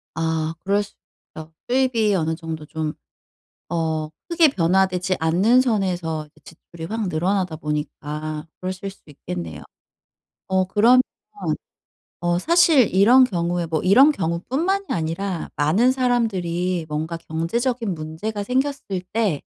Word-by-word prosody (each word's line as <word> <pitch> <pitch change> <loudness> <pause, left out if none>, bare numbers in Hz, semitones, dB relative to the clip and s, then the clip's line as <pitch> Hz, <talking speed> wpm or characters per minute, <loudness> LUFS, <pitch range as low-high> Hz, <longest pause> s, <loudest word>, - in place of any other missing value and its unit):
아 160 0 -1
그럴 200 +2 +2
수 200 - -14 0.4
있죠. 160 0 -9 0.2
수입이 240 -5 +2
어느 160 -2 0
정도 160 -2 -6
좀 155 -1 -3 0.8
어 160 -2 -1 0.2
크게 335 -3 +5
변화되지 185 -1 +1
않는 190 +10 +4
선에서 180 -9 -1
이 - - -23
지출이 165 0 -11
확 225 -3 -1
늘어나다 180 +1 0
보니까 150 0 -4
그러실 185 +1 -4
수도 190 -5 -16
있겠네요. 85 - -6 0.9
어 190 0 +2
그러면 230 +6 +5 1.2
어 175 0 +1
사실 325 - +4
이런 240 +7 +7
경우에 175 -4 -1
뭐 160 -2 -1
이런 265 +11 +6
경우 170 - -1
뿐만이 380 +9 0
아니라 170 +2 -2
많은 190 +13 +3
사람들이 185 -9 0
뭔가 160 +2 -3
경제적인 205 +8 -2
문제가 165 +7 -4
생겼을 255 -5 -1
때 210 -10 +1
180 Hz, 275 characters per minute, -22 LUFS, 160-225 Hz, 1.2 s, 이런